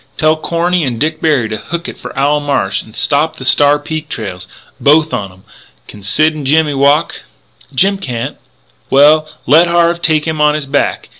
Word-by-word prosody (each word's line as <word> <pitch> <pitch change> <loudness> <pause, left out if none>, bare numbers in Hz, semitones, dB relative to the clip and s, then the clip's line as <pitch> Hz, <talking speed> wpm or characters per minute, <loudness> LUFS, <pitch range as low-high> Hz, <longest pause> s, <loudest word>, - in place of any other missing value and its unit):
Tell 155 0 +2
Corny 170 +2 -1
and 120 -5 -3
Dick 155 +1 -2
Berry 145 -8 +1
to 110 - -4
hook 170 +8 -6
it - - -7
for - - -9
Owl 145 +2 +2
Marsh 140 -9 -1
and 110 - -16
stop 150 +3 0
the 130 - -8
Star 145 +2 +4
Peak 155 +1 -6
trails 95 -5 -6 0.3
both 155 +2 +3
on 100 -2 -3
'em.... 95 +1 -20 0.4
Can 105 - -12
Sid 155 +11 +2
and 150 -3 -6
Jimmy 150 +1 +2
walk?" 140 +4 +1 0.5
"Jim 195 +8 +1
can't 125 -10 -5 0.3
" - - -38
"Well, 155 +3 +4 0.2
let 160 +6 +5
Harve 170 0 +1
take 155 -3 +1
him 160 -2 -2
on 150 0 +3
his 150 -2 -3
back. 140 +1 -2
150 Hz, 195 wpm, -13 LUFS, 135-160 Hz, 0.5 s, let